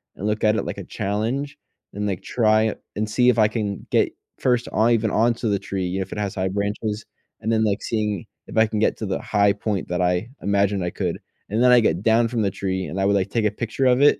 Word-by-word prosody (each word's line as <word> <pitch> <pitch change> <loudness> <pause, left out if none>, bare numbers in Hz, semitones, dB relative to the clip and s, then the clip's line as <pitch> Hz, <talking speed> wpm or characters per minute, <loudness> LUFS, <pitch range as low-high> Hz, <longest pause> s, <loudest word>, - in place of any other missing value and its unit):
and 100 - -4
look 105 0 -1
at 110 0 +4
it 105 - -1
like - - -5
a - - -5
challenge, 115 +8 -2 0.4
and, 105 +1 -2
like, 95 -3 -2
try 110 -2 +2 0.2
and 110 +1 -2
see 125 +3 +3
if 120 -2 +3
I 105 - +6
can 105 -3 -3
get - - +3 0.3
first 125 -2 +1
on 115 +2 +3
even 115 -2 +2
onto 115 0 +1
the 100 - +2
tree, 95 -1 -3
you 90 +2 -2
know, - - 0
if 95 - -14
it - - -4
has 100 -2 -2
high 95 0 0
branches, 105 +2 -2 0.4
and 110 - -1
then, 110 -1 +2
like, 105 -2 0
seeing 105 -5 -1 0.2
if - - -7
I 110 0 +5
can 110 -1 -2
get - - +2
to 110 - -4
the 95 -2 -2
high 100 -1 +3
point 105 -2 -3
that 90 +1 -1
I 90 +5 +1
imagined 100 -1 +1
I 90 - -1
could, - - -2 0.3
and 110 +4 +1
then 125 - +6
I 125 - +8
get 85 -2 +1
down 115 +1 +4
from 115 -1 -1
the 100 - +1
tree, 95 -1 -2
and 85 +6 -5
I - - +2
would, 100 +1 +3
like, 95 -2 0
take 115 -2 +1
a 105 - +3
picture 115 +4 -2
of 125 +1 +4
it, 145 0 +5
105 Hz, 265 wpm, -23 LUFS, 100-115 Hz, 0.4 s, I